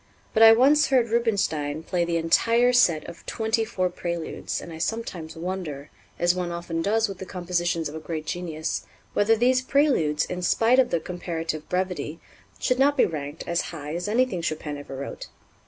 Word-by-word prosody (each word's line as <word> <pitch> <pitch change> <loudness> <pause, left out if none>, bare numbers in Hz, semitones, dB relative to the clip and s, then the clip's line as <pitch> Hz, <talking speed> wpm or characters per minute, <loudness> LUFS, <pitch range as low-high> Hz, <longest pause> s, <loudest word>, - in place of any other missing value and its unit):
But 220 - +2
I 225 0 +11
once 275 +6 +5
heard 250 -4 +3
Rubinstein 160 -10 0
play 175 +1 0
the 170 0 0
entire 230 +9 +3
set 170 -11 +3
of 170 - -10
twenty 220 0 0
four 190 -5 -1
Préludes, 170 -2 -4
and 170 - -9
I 160 - -8
sometimes 175 -6 -4
wonder, 165 -5 -5 0.3
as 175 0 +3
one 180 -1 -3
often 170 -1 -3
does 220 +5 +2
with 195 -2 -8
the 190 - -6
compositions 175 -3 -1
of 145 - -8
a 160 - -5
great 155 -1 -5
genius, 160 -1 -3 0.3
whether 215 +2 +4
these 255 +3 +3
Préludes, 255 - +2
in 180 0 -4
spite 230 +7 +3
of 255 -2 +4
their 170 - +1
comparative 165 -2 -5
brevity, 180 -3 -2 0.4
should 250 0 0
not 285 +2 +4
be - - +5
ranked 145 -1 -5
as 170 0 +1
high 150 -2 -6
as 175 +3 -3
anything 230 -4 +1
Chopin 155 -2 -3
ever 140 -1 -8
wrote. 140 +1 -6
175 Hz, 185 wpm, -25 LUFS, 160-225 Hz, 0.4 s, I